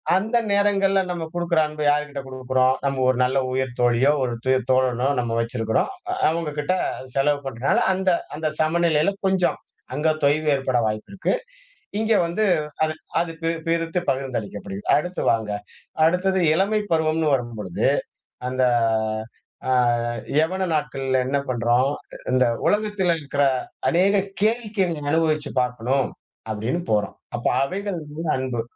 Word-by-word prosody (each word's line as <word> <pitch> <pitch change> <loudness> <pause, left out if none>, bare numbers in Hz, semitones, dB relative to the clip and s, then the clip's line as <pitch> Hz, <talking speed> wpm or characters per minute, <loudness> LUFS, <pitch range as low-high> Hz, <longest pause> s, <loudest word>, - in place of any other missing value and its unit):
அந்த 220 +5 +1 0.2
நேரங்கள்ல 200 -1 +3
நம்ம 170 -2 -3
குடுக்குற 170 -1 +1
அன்ப 150 0 -7
யார்கிட்ட 145 -1 0
குடுக்குறோம்? 130 0 +1
நம்ம 135 -1 0
ஒரு 130 - +2
நல்ல 130 +2 0
உயிர் 130 -1 -2
தோழியோ, 120 +4 +4
ஒரு 120 -2 -1
உயிர் 130 0 +3 0.2
தோழனோ 130 0 +2
நம்ம 115 -1 -2
வச்சிருக்கிறோம். 115 - 0 0.4
அவங்ககிட்ட 155 0 -1 0.4
செலவு 145 +1 +2
பண்றதுனால 130 +1 +1
அந்த 190 0 0 0.3
அந்த 155 0 -1
சமநிலையில 160 +2 +2
கொஞ்சம், 190 -2 +2 0.4
அங்க 155 +2 +2
தொய்வு 150 +2 +2
ஏற்பட 130 -2 0
வாய்ப்பு 110 - -4
இருக்கு. 195 - 0 0.7
இங்க 220 0 +2
வந்து 175 +6 -1 0.4
அது 155 0 +1 0.3
அது 170 -1 -1
பி 165 - 0 0.2
பிரித்து 165 +1 0
பகிர்ந்தளிக்கப்படுகிறது. 110 -7 -3
அடுத்து 180 +5 -1
வாங்க, 110 -2 -1 0.5
அடுத்தது 185 +3 +2
இளமை 200 +5 +2
பருவம்ன்னு 160 -1 +2
வரும்பொழுது, 110 -7 -2 0.6
அந்த 130 0 0 1.1
அ - - +2 0.7
யௌவன 185 +4 +1
நாட்கள்ல 135 -3 0
என்ன 140 +1 +1
பண்றோம்? 120 +3 +2 0.4
இந்த 130 0 +4 0.2
உலகத்துல 205 -5 +1
இருக்குற 140 0 +1 0.5
அநேக 195 +3 +3 0.2
கேளிக்கையை 215 -3 +1
நீங்க 145 -2 -4
அனுபவிச்சு 155 -2 +1
பாக்கணும், 125 +2 0 0.4
அப்படீன்னு 110 +10 -2
போறோம். 105 -1 0 0.2
அப்ப - - -2 0.2
அவைகள் 190 +3 -3
மீது 160 0 -4
அன்பு 130 -3 -2
150 Hz, 130 wpm, -23 LUFS, 130-175 Hz, 1.1 s, தோழியோ